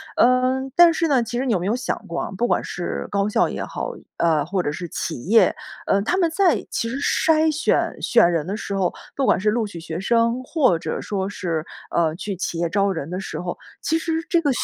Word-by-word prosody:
呃， 255 Hz, +1 st, +3 dB
但 345 Hz, -1 st, +8 dB
是 330 Hz, -, +1 dB
呢， 275 Hz, -5 st, +3 dB
其 240 Hz, +1 st, -3 dB
实 260 Hz, -, -1 dB
你 245 Hz, -, +1 dB
有 185 Hz, -, +1 dB
没 180 Hz, -, -3 dB
有 215 Hz, -, +1 dB
想 250 Hz, 0 st, -2 dB
过 170 Hz, -, -3 dB
啊， -, -, -4 dB
不 240 Hz, +6 st, 0 dB
管 -, -, +1 dB
是 175 Hz, -, -4 dB
高 200 Hz, 0 st, +1 dB
校 -, -, +2 dB
也 -, -, -4 dB
好， -, -, -4 dB, 0.3 s
呃， 160 Hz, -3 st, +2 dB
或 180 Hz, +4 st, -1 dB
者 145 Hz, -, -1 dB
是 175 Hz, +3 st, -6 dB
企 155 Hz, -7 st, -4 dB
业， 220 Hz, +5 st, +4 dB, 0.3 s
呃， 200 Hz, -, +2 dB
他 350 Hz, -, 0 dB
们 340 Hz, -4 st, +2 dB
在 360 Hz, 0 st, +2 dB
其 230 Hz, -, -1 dB
实 250 Hz, -, -3 dB
筛 315 Hz, +2 st, +3 dB
选、 310 Hz, +3 st, 0 dB
选 225 Hz, -8 st, +4 dB
人 165 Hz, -2 st, -1 dB
的 200 Hz, +3 st, -3 dB
时 200 Hz, -, -4 dB
候， 190 Hz, -2 st, +1 dB, 0.2 s
不 275 Hz, -, 0 dB
管 -, -, +4 dB
是 210 Hz, +3 st, +2 dB
录 225 Hz, -1 st, 0 dB
取 175 Hz, -4 st, -9 dB
学 165 Hz, 0 st, -5 dB
生 230 Hz, +4 st, +2 dB
或 255 Hz, -, +2 dB
者 -, -, -3 dB
说 195 Hz, -2 st, -2 dB
是， 170 Hz, -6 st, -3 dB, 0.3 s
呃， 160 Hz, -2 st, +1 dB
去 200 Hz, +2 st, -4 dB
企 175 Hz, -2 st, -3 dB
业 170 Hz, 0 st, 0 dB
招 200 Hz, +3 st, +1 dB
人 165 Hz, -3 st, -5 dB
的 180 Hz, -, -3 dB
时 195 Hz, -, -5 dB
候， 175 Hz, 0 st, -5 dB, 0.2 s
其 320 Hz, +1 st, +1 dB
实 325 Hz, 0 st, -2 dB
这 340 Hz, -, +2 dB
个 295 Hz, -, +1 dB
205 Hz, 260 characters per minute, -22 LUFS, 175-260 Hz, 0.3 s, 但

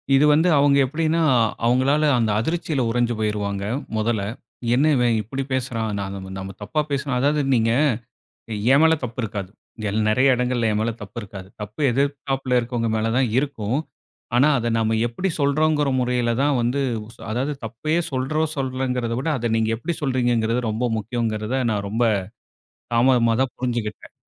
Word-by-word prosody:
இது 140 Hz, -, +5 dB
வந்து, 160 Hz, +4 st, +3 dB
அவுங்க 140 Hz, 0 st, +4 dB
எப்படினா, 160 Hz, +4 st, 0 dB, 0.4 s
அவுங்களால 130 Hz, +5 st, +3 dB, 0.2 s
அந்த 110 Hz, -2 st, +1 dB
அதிர்ச்சியில 160 Hz, 0 st, -1 dB
உறஞ்சு 120 Hz, 0 st, +1 dB
போய்ருவாங்க, 100 Hz, -2 st, -2 dB, 0.3 s
மொதல்ல. 110 Hz, -2 st, 0 dB, 0.5 s
என்ன 140 Hz, +5 st, +3 dB
இவன் 120 Hz, -2 st, +2 dB
இப்புடி 135 Hz, +6 st, -4 dB
பேசுறான்? 115 Hz, -4 st, -1 dB
நாங்க 100 Hz, 0 st, -5 dB, 0.2 s
நம்ம 95 Hz, 0 st, -6 dB
தப்பா 130 Hz, +10 st, -1 dB
பேசுனா 140 Hz, -2 st, -1 dB
அதாவது 145 Hz, +2 st, +2 dB
நீங்க, 115 Hz, 0 st, +2 dB, 1.0 s
என் 140 Hz, -, +5 dB
மேல 160 Hz, 0 st, +6 dB
தப்பு 120 Hz, +1 st, -5 dB
இருக்காது. 100 Hz, -3 st, -4 dB, 0.4 s
எல் 105 Hz, +2 st, -1 dB
நெறய 130 Hz, +4 st, +4 dB
இடங்கள்ல 125 Hz, -2 st, 0 dB
என் 105 Hz, -, 0 dB
மேல 115 Hz, +1 st, 0 dB
தப்பு 105 Hz, +3 st, -10 dB
இருக்காது. 95 Hz, -2 st, -9 dB
தப்பு 105 Hz, +8 st, -7 dB
எதிர்தாப்புல 135 Hz, -1 st, 0 dB
இருக்கவங்க 115 Hz, -1 st, -2 dB
மேல 110 Hz, +1 st, 0 dB
தான் 130 Hz, -2 st, +3 dB
இருக்கும். 130 Hz, -4 st, -1 dB, 0.6 s
ஆனா, 135 Hz, +4 st, +5 dB
அத 120 Hz, 0 st, -1 dB
நாம 110 Hz, 0 st, +1 dB
எப்படி 180 Hz, +12 st, -2 dB
சொல்றோங்கற 150 Hz, 0 st, +2 dB
முறையில 125 Hz, -1 st, 0 dB
தான் 145 Hz, -1 st, +2 dB
வந்து 125 Hz, +4 st, 0 dB, 0.5 s
அதாவது 130 Hz, +6 st, -1 dB
தப்பயே 155 Hz, +9 st, -1 dB
சொல்றோம், 150 Hz, +4 st, 0 dB
சொல்லலங்கறத 130 Hz, -3 st, -2 dB
விட, 140 Hz, -, -4 dB
அத 120 Hz, -1 st, -2 dB
நீங்க 110 Hz, 0 st, +1 dB
எப்படி 170 Hz, +8 st, -3 dB
சொல்றீங்கங்றது 120 Hz, -3 st, +1 dB
ரொம்ப 115 Hz, +3 st, -1 dB
முக்கியங்கறத, 110 Hz, +1 st, -2 dB, 0.2 s
நான் 100 Hz, -1 st, -2 dB
ரொம்ப 115 Hz, +3 st, 0 dB, 0.9 s
தாமதமா 115 Hz, -1 st, +4 dB
தான் 135 Hz, -, -2 dB
புரிஞ்சுகிட்டேன். 120 Hz, -4 st, -4 dB
125 Hz, 150 wpm, -22 LUFS, 110-140 Hz, 1.0 s, மேல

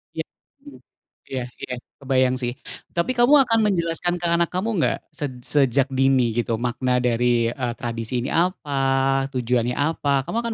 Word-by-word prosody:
Ya, -, -, -2 dB, 0.4 s
mhm, 290 Hz, -, -13 dB, 0.5 s
iya 130 Hz, -, -2 dB, 0.2 s
iya 125 Hz, -, -4 dB, 0.3 s
kebayang 130 Hz, -1 st, +2 dB
sih. 120 Hz, -1 st, -1 dB, 0.4 s
Tapi 170 Hz, +8 st, +1 dB
kamu 240 Hz, +4 st, +5 dB
akan 225 Hz, 0 st, +3 dB
menjelaskan 175 Hz, -2 st, 0 dB
ke -, -, -3 dB
anak 170 Hz, 0 st, +2 dB
kamu 185 Hz, +5 st, -1 dB
nggak -, -, +1 dB, 0.2 s
sej 145 Hz, -3 st, -3 dB
sejak 135 Hz, -1 st, +2 dB
dini 135 Hz, -1 st, +4 dB
gitu 120 Hz, -1 st, 0 dB
makna 125 Hz, +1 st, 0 dB
dari, 120 Hz, -1 st, +2 dB
eee, 120 Hz, -2 st, -3 dB
tradisi 120 Hz, 0 st, -3 dB
ini -, -, -3 dB
apa? 135 Hz, -6 st, +1 dB
Tujuannya 125 Hz, -1 st, 0 dB
apa? 145 Hz, -2 st, 0 dB
Kamu 225 Hz, -, -3 dB
akan 235 Hz, -1 st, -2 dB
135 Hz, 160 wpm, -23 LUFS, 125-165 Hz, 0.5 s, kamu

